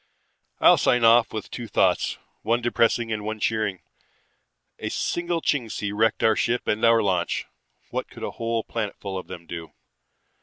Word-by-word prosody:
"I'll - - +7
sign 125 -1 +3
off 115 0 +6
with 110 - -6
two 120 -2 -6
thoughts, - - +1 0.2
one 115 +1 +1
depressing 115 -1 +1
and 105 -1 -4
one 110 +1 -4
cheering. 105 -3 -1 1.0
A - - -3
single 175 -1 -1
Chingsi 115 -6 -1
wrecked 110 +1 +1
our 110 -1 +5
ship 120 +3 0
and 105 - 0
our 115 -1 +5
launch. 90 -3 0 0.5
What - - -3
could - - -11
a - - -3
whole 115 -1 -2
planetful 100 -3 -4
of 95 - -5
them 85 - -9
do? 85 -1 -8
110 Hz, 160 wpm, -25 LUFS, 105-115 Hz, 1.0 s, I'll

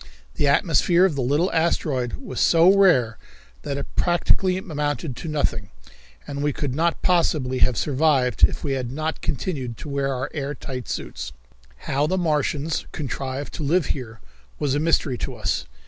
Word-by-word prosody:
The 145 - +1
atmosphere 170 +5 +4
of 190 - +1
the 140 - -2
little 145 +9 +1
asteroid 150 -6 0
was 265 - -6
so 170 +3 +6
rare 135 - +4 0.4
that 140 -1 -3
it - - -7
practically 180 +1 +2
amounted 150 -6 -3
to - - -6
nothing, 140 -9 -1 0.6
and 140 0 -5
we 145 0 +1
could 140 -1 -3
not 165 +4 0
possibly 150 -8 +2
have 125 - +3
survived 140 -4 +1
if - - +4
we 145 - -1
had 130 -3 -2
not 155 +3 -3
continued 130 - -3
to - - -8
wear 140 -1 -1
our 130 0 -3
air 145 -1 -3
tight 130 -2 -7
suits. - - -5 0.5
How 140 +2 +1
the 185 - 0
Martians 155 -2 0
contrived 135 -1 -4
to 155 - -5
live 160 +3 +2
here 115 -5 -8 0.4
was 140 -3 0
a 145 - +1
mystery 155 -5 +1
to - - -4
us. - - -1
145 Hz, 170 wpm, -23 LUFS, 130-165 Hz, 0.6 s, so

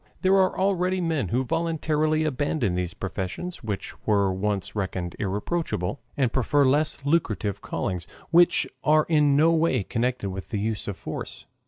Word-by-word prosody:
There 190 +1 +3
are 190 -1 +3
already 185 -1 +1
men 160 - 0
who 125 +8 0
voluntarily 155 +1 0
abandon 145 - 0
these 90 -1 -2
professions 95 - -5
which 105 -3 -4
were 100 -3 +3
once 100 +1 -2
reckoned 95 -3 -3
irreproachable, 105 - -2 0.2
and 130 -4 +1
prefer 140 +2 +3
less 140 +1 +2
lucrative 115 - 0
callings 90 -2 -3 0.2
which 175 0 +5 0.2
are 155 0 +4
in 150 -3 +4
no 160 +3 +5
way 160 -9 +2
connected 115 -2 -1
with 95 0 -7
the 110 - -2
use 110 +1 -2
of 100 -3 -4
force. - - -6
130 Hz, 155 wpm, -25 LUFS, 100-160 Hz, 0.2 s, which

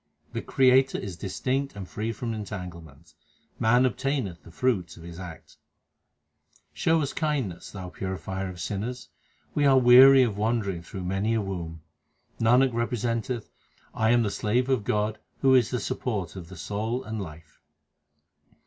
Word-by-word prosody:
The - - -2
Creator 130 0 +4
is 95 -3 -5
distinct 130 +9 -2
and 95 -3 -7
free 110 +4 -3
from 115 +1 -4
entanglements; 90 -8 -8 0.5
man 120 +3 +4
obtaineth 125 - -1
the - - -15
fruit 90 - -1
of 85 - -12
his 85 0 -9
acts. 90 -3 -10 1.2
Show 165 0 +2
us 140 - -3
kindness, 140 - -2
Thou 95 -3 -7
purifier 95 +1 -4
of 90 -1 -9
sinners; 110 +8 -4 0.4
we 145 - +1
are 135 -2 +6
weary 130 +2 +8
of 105 -4 -1
wandering 105 -5 0
through 95 +2 -7
many 95 +5 0
a 110 - +1
womb. 85 -5 -5 0.6
Nanak 125 +3 +4
representeth 115 0 -2 0.4
I 110 0 +1
am 120 0 +4
the 105 - -1
slave 125 +7 0
of 125 -6 +1
God 105 0 0 0.2
who 135 -1 +5
is 120 -4 +5
the 125 - -1
Support 105 -8 -3
of 85 -3 -8
the 95 - -10
soul 110 +8 -3
and 110 -3 -4
life. 80 -3 -11
110 Hz, 155 wpm, -27 LUFS, 95-125 Hz, 1.2 s, weary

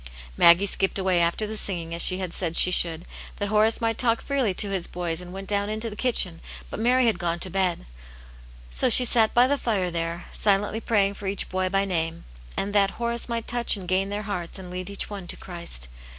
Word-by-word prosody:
Maggie 170 - +5
iskipped 195 0 0
away 185 -2 +1
after 170 +5 0
the 215 +1 -6
singing, 170 -6 -2
as 170 - +1
she 185 - +7
had 185 -2 -5
isaid 170 -2 -1
she 180 - +6
should, 170 -1 +4 0.3
that 205 -1 -4
Horace 215 +1 +2
might 225 -1 -1
talk 230 -2 +2
freely 270 -7 -1
to 205 0 0
his 190 -3 -1
boys, 175 -1 -5
and 180 0 -11
went 195 +1 -8
dqwn 205 0 -1
into 220 +1 -3
the - - -9
kitchen, 200 -8 +1 0.3
but - - -6
Mary 250 +3 +2
h^df 220 -6 +1
gone 170 -2 -2
to 185 - 0
bed. 185 - -1 0.9
So - - +2
she 250 - +6
sat 225 -2 +3
by 245 +1 +6
the 280 +2 0
fire 195 -6 -1
there, 170 +1 -4
silently 205 +2 +1
praying 200 -4 +1
for 200 -1 -8
each 195 0 -3
boy 185 0 -2
by 195 +1 0
name, 165 -3 -3 0.3
and 200 +1 -3
that 195 -1 +1
Horace 235 0 -3
might 230 -1 -3
touch 240 -2 0
and 185 -2 -9
gain 190 +2 0
their 205 +1 -4
hearts, 180 -4 -5
and 185 -2 -9
lead 185 +1 -6
each 200 - -2
one 200 -4 -8
to - - -6
Christ. 170 - -2
195 Hz, 225 wpm, -24 LUFS, 175-215 Hz, 0.9 s, she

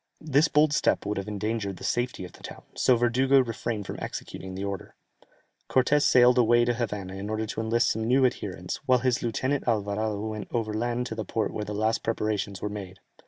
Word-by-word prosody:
This 150 +1 +3
bold 150 0 +3
step - - +2
would 105 - -2
have 100 +1 -4
endangered 105 -1 -3
the - - -11
safety 120 -6 -1
of 90 - -11
the - - -16
town, - - -9
so 130 - +3
Verdugo 130 +3 +3
refrained 115 -3 -3
from - - -6
executing 95 0 -6
the 95 - -4
order. 100 -1 -5 0.7
Cortès 135 +3 +3
sailed 125 -2 +5
away 120 0 +5
to 120 - +1
Havana 105 -6 -3
in 100 +2 -5
order 110 0 -1
to 110 - -4
enlist 115 +2 +2
some 110 0 -2
new 130 +3 +4
adherents, 95 -7 -3
while 130 -1 +5
his 125 -2 +2
lieutenant 130 +4 -1
Alvarado 105 -1 0
went 110 -1 -5
over 110 -3 -1
land 120 +2 -1
to 120 - -4
the 110 -1 -3
port 110 +1 -2
where 105 - -3
the 105 +1 -5
last 110 +2 +1
preparations 105 -4 -2
were - - 0
made. 100 -2 -7
110 Hz, 210 wpm, -27 LUFS, 105-125 Hz, 0.7 s, sailed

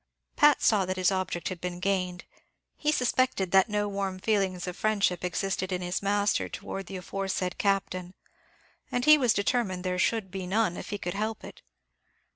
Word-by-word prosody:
Pat 295 -1 +5
saw 210 -3 +4
that 185 0 -2
his 185 0 +3
object 185 -3 -2
had 180 -2 -7
been 180 0 -4
gained; 180 -1 -1 0.5
he 300 - 0
suspected 250 - +1
that 190 +2 +5
no 210 0 0
warm 195 -2 -3
feelings 190 -3 0
of 180 -1 -5
friendship 200 -5 +1
existed 190 +1 -2
in 180 0 -2
his 180 +1 -2
master 205 +1 +1
towards 195 -2 -6
the 195 - -6
aforesaid 185 0 -3
Captain, 185 -2 -1 0.8
and 245 +1 0
he 305 0 +9
was 255 -6 +3
determined 200 -3 0
there 180 -1 -1
should 210 -1 0
be 190 -1 -5
none 205 -2 +1
if - - -7
he 205 - -3
could 175 -3 -4
help 215 +2 -3
it. - - -11
195 Hz, 180 wpm, -28 LUFS, 180-210 Hz, 0.8 s, he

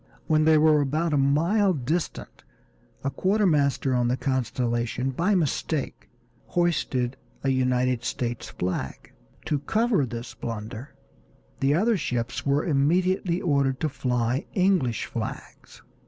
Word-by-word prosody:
When 155 -1 +3
they 160 0 +6
were 155 -1 +5
about 155 +4 0
a - - +3
mile 165 +9 +3
distant 155 +4 -3 0.6
a 135 - -1
quartermaster 155 -10 +2
on 125 -1 +2
the 125 +2 0
Constellation, 125 -1 -1
by 175 +10 +1
mistake, 155 -3 -2 0.4
hoisted 135 -8 0 0.3
a 135 - +1
United 125 -2 +1
States 120 -1 -3
flag. 90 +1 -4 0.3
To 150 - 0
cover 215 - +1
this 120 0 -6
blunder 115 +3 -7 0.6
the 140 +2 +2
other 215 +5 +2
ships 120 -6 -2
were 140 +2 +2
immediately 175 +4 +1
ordered 140 -5 +1
to 155 - +1
fly 125 -2 -1
English 180 - +2
flags. - - -7
140 Hz, 125 wpm, -25 LUFS, 125-170 Hz, 0.6 s, they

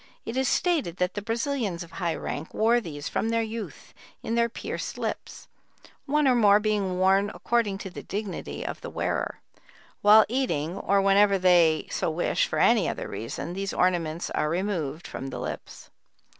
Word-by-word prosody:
It 230 - -5
is 265 0 +1
stated 305 - 0
that 180 -1 0
the 205 - -4
Brazilians 225 - -2
of 170 - -14
high 170 -3 -2
rank 155 +4 -5
wore 235 +2 +3
these, 145 -7 -6
from 225 - -1
their 230 0 +1
youth, 225 0 -7 0.3
in 225 - -2
their 235 0 +2
pierced - - -5
lips; - - -5 0.6
one 295 0 +2
or 260 - +5
more 210 -4 +5
being 205 -4 0
worn 195 +2 +3
according 230 -5 0
to 190 - -6
the - - -8
dignity 205 0 -5
of - - -5
the - - -6
wearer. - - -2 0.6
While 210 +1 +7
eating, 200 - -1
or 195 0 +1
whenever 200 0 +5
they 175 -4 +4
so - - -1
wish 160 +2 0
for - - -3
any - - +4
other - - -4
reason, 115 +9 -5
these 195 +1 -3
ornaments 175 -2 0
are 150 - 0
removed 170 -4 -2
from 135 - -6
the 135 - -6
lips." - - -7
195 Hz, 175 wpm, -26 LUFS, 175-225 Hz, 0.6 s, While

